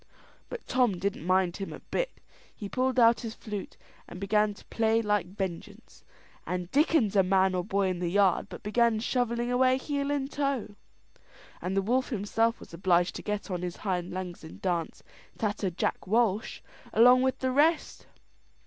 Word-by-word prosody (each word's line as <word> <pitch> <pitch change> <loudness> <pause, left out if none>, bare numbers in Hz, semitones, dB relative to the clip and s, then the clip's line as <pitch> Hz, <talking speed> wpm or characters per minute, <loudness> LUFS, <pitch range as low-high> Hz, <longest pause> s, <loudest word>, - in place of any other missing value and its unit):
But 485 - -7
Tom 245 -7 +2
didn't 185 -2 -3
mind 185 -1 +2
him 195 -1 -5
a - - -8
bit. - - -2 0.5
He 205 - -6
pulled 255 +3 0
out 230 0 +6
his 225 -2 -6
flute 210 -3 -7 0.3
and 180 - -9
began 210 +1 +1
to - - -16
play 225 0 +1
like 210 -4 0
vengeance; 195 +3 -7 0.4
and 180 -1 -4
dickens 280 - +3
a 195 - +6
man 190 0 +3
or 180 -1 -1
boy 195 0 0
in 180 -1 -3
the 175 -1 -1
yard 195 -1 +2
but - - -9
began 225 +1 +2
shovelling 240 0 -1
away 255 +1 +3
heel 280 +1 -2
and 285 -1 -1
toe, 275 -7 -2 0.9
and 190 +2 -2
the 195 - +2
wolf 255 +5 +1
himself 225 0 0
was - - -14
obliged 175 0 +2
to - - -6
get 210 -1 -4
on 180 -1 -2
his 180 -1 -4
hind 180 -2 -1
legs 180 -2 -6
and 160 - -11
dance 175 -3 -2 0.3
"Tatther 205 -2 -1
Jack 175 - -3
Walsh," 220 0 +1 0.3
along 250 +3 +6
with 260 0 +1
the 260 0 -1
rest. 305 +5 +1
210 Hz, 175 wpm, -28 LUFS, 185-245 Hz, 0.9 s, out